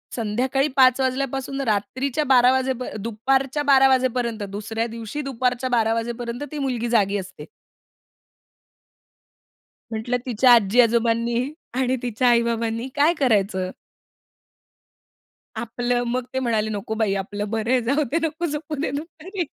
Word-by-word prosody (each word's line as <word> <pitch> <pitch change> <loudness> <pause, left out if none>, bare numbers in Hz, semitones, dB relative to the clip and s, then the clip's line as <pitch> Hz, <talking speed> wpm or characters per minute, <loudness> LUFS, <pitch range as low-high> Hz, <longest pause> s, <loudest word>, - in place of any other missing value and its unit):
संध्याकाळी 250 +5 0
5:00 255 -1 +6
वाजल्यापासून 270 +1 -2
रात्रीच्या 260 +7 -1
12:00 255 -2 +5
वाजेपर 260 -2 -1
दुपारच्या 265 +7 0
12:00 270 -2 +6
वाजेपर्यंत, 250 -4 0
दुसऱ्या 220 +3 -3
दिवशी 230 +5 -6
दुपारच्या 255 -2 -1
12:00 225 -2 +2
वाजेपर्यंत, 235 +2 -4
ती 300 - -5
मुलगी 245 -4 -2
जागी 205 -3 +2
असते. 190 -1 -8 2.5
म्हटलं, 225 +3 -1
"तिच्या 250 0 +4
आजी 225 0 +4
आजोबांनी 235 +2 +1 0.2
आणि 260 0 +1
तिच्या 245 +1 0
आई 235 -1 +5
बाबांनी 230 +1 -2
काय 295 +4 +4
करायचं?" 200 -7 +1 1.9
आपलं, 245 +1 -1
मग 250 0 -1
ते 260 - 0
म्हणाले, 225 -4 0
"नको 215 +1 -4
बाई 220 -3 +1
आपलं 205 +1 -5
बरं 225 +2 -1
आहे 255 -1 +3
जाऊदे, 285 +2 +1
नको 325 +3 -4
झोपु 300 0 -4
दे 300 - -1
दुपारी." 345 +4 -6
245 Hz, 130 wpm, -23 LUFS, 225-265 Hz, 2.5 s, 5:00